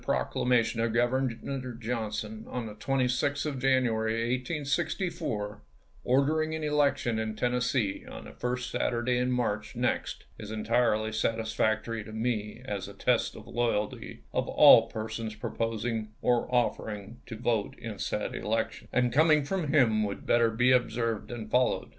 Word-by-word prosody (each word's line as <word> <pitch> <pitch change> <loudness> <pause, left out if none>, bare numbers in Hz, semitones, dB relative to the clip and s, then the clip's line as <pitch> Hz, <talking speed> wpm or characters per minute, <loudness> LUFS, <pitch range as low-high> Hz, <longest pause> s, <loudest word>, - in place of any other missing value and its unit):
proclamation 115 -2 +1
of 115 -1 0
Governor 130 +1 -1
Johnson, 110 -2 -4
on 125 -2 -3
the 110 - -7
26th 135 +4 0
of 145 -4 -3
January, 115 -2 +1
1864, 145 - -2 0.4
ordering 155 +5 +2
an 160 - -4
election 145 -6 +1
in 110 -1 -3
Tennessee 125 -3 0
on - - -8
the - - -10
first 125 0 -3
Saturday 120 +1 0
in 125 0 +1
March 110 -4 -1
next, - - -1 0.2
is 105 - -7
entirely 110 0 +1
satis 110 0 -1
i864. - - -13
factory 110 +1 0
to 110 - -10
me 110 0 -2
as 100 -6 -4
a - - -9
test - - +1
of - - -11
loyalty 115 -3 -2
of - - 0
all 115 - +8
persons 110 0 -5
proposing, 115 0 -2
or 120 -1 +2
offering, 110 -3 -1
to 115 - -6
vote 115 -3 -1
in 110 -4 -7
said 105 - -2
elections; 110 +1 -2
and 125 -1 +1
coming 155 0 +5
from 180 0 -1
him 125 -7 +4
would 100 -1 -4
better 120 -1 +4
be 120 +3 +3
observed 115 -4 +1
and 110 -3 -7
followed. 125 0 +2
120 Hz, 150 wpm, -29 LUFS, 110-125 Hz, 0.4 s, all